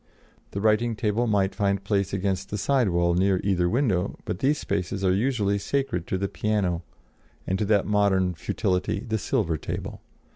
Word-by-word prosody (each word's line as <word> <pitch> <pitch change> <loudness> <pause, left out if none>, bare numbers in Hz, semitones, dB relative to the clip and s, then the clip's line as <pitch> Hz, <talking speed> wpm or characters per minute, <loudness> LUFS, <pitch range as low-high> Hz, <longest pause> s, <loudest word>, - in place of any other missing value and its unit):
The 100 - -4
writing 110 +2 +2
table 110 +2 0
might 100 -3 +2
find 100 -1 0
place 100 -1 0
against 95 -1 -1
the 105 - -3
side 130 +1 +2
wall 85 0 +2
near 95 +1 +2
either 90 -3 +2
window; 105 -6 0
but 90 - -3
these 145 +5 +2
spaces 100 -2 -2
are 90 - +4
usually 100 -2 +1
sacred 115 -8 -2
to 95 - -1
the 100 +1 -1
piano 95 -5 -1 0.6
and 95 +1 -1
to 105 - +1
that 100 -1 +3
modern 100 -3 +2
futility, 90 +2 -1
the 110 -3 -2
silver 100 - 0
table. - - -5
100 Hz, 175 wpm, -25 LUFS, 95-110 Hz, 0.6 s, are